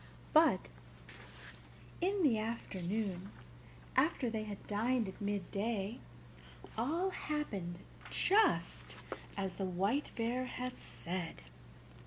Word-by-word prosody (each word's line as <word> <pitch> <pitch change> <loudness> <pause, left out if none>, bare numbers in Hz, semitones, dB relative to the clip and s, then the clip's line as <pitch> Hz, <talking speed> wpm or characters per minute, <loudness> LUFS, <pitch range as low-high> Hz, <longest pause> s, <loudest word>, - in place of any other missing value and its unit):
But - - +6 1.3
in 385 +1 +2
the 240 -8 +5
afternoon, 200 -3 -2 0.7
after 265 -3 +3
they 220 -1 -1
had 205 -2 -6
dined 225 +2 +2
at 190 - -8
midday, 205 +2 -1 0.8
all 325 +12 +1
happened 205 - -2 0.3
just 425 +3 +3 0.4
as 195 -2 -1
the 195 - -2
White 195 +10 +1
Bear 240 +2 +1
had 250 0 -4
said. 170 - -4
220 Hz, 95 wpm, -36 LUFS, 195-255 Hz, 1.3 s, But